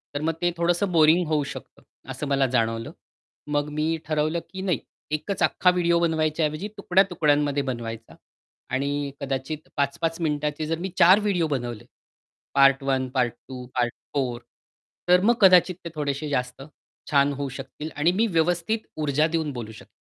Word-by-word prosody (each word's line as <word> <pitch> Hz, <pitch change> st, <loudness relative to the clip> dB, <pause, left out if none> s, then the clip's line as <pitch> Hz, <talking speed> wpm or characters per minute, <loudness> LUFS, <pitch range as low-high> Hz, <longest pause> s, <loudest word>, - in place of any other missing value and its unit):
तर 145 Hz, -, -2 dB
मग 165 Hz, +1 st, 0 dB
ते 175 Hz, 0 st, +2 dB
थोडंसं 175 Hz, +3 st, +1 dB
बोरिंग 165 Hz, +1 st, +5 dB
होऊ 150 Hz, -2 st, +1 dB
शकतं, 140 Hz, -, -9 dB, 0.3 s
असं 130 Hz, +3 st, -5 dB
मला 135 Hz, -1 st, +2 dB
जाणवलं. 115 Hz, -1 st, 0 dB, 0.6 s
मग 145 Hz, 0 st, 0 dB
मी 155 Hz, +2 st, -1 dB
ठरवलं, 155 Hz, +2 st, 0 dB
की 190 Hz, 0 st, -7 dB
नाही 185 Hz, -3 st, 0 dB, 0.3 s
एकच 165 Hz, +6 st, -2 dB
अख्खा 180 Hz, -, +3 dB
व्हिडिओ 170 Hz, -1 st, +2 dB
बनवायच्या 160 Hz, -1 st, +1 dB
ऐवजी 155 Hz, +7 st, -3 dB
तुकड्या-तुकड्यांमध्ये 150 Hz, -7 st, +2 dB
बनवायचा. 115 Hz, -3 st, -6 dB, 0.5 s
आणि 140 Hz, +2 st, -1 dB
कदाचित 140 Hz, +3 st, -4 dB
5-5 155 Hz, +4 st, -1 dB
मिनिटाचे 150 Hz, -1 st, -1 dB
जर 165 Hz, +1 st, -1 dB
मी 190 Hz, +2 st, -3 dB
4 185 Hz, +4 st, +7 dB
व्हिडिओ 195 Hz, -6 st, 0 dB
बनवले. 120 Hz, -5 st, -4 dB, 0.7 s
पार्ट 135 Hz, 0 st, +5 dB
1, 135 Hz, -1 st, 0 dB
पार्ट 125 Hz, -3 st, 0 dB
2, 125 Hz, -1 st, -8 dB
पार्ट 120 Hz, -1 st, +1 dB, 0.2 s
4, 125 Hz, -4 st, -1 dB, 0.7 s
तर 180 Hz, 0 st, +6 dB
मग 235 Hz, +3 st, +4 dB
कदाचित 185 Hz, -1 st, +6 dB
ते -, -, -4 dB
थोडेशे 145 Hz, 0 st, -2 dB
जास्त 125 Hz, -2 st, -2 dB, 0.5 s
छान 140 Hz, -1 st, +3 dB
होऊ 140 Hz, 0 st, -4 dB
शकतील 155 Hz, +1 st, -7 dB
आणि 150 Hz, +4 st, +3 dB
मी 215 Hz, +5 st, +1 dB
व्यवस्थित 175 Hz, +4 st, +1 dB, 0.2 s
ऊर्जा 150 Hz, +1 st, +2 dB
देऊन 160 Hz, -2 st, -1 dB
बोलू 115 Hz, -3 st, -6 dB
शक 110 Hz, -, -13 dB
150 Hz, 160 wpm, -25 LUFS, 135-170 Hz, 0.7 s, 4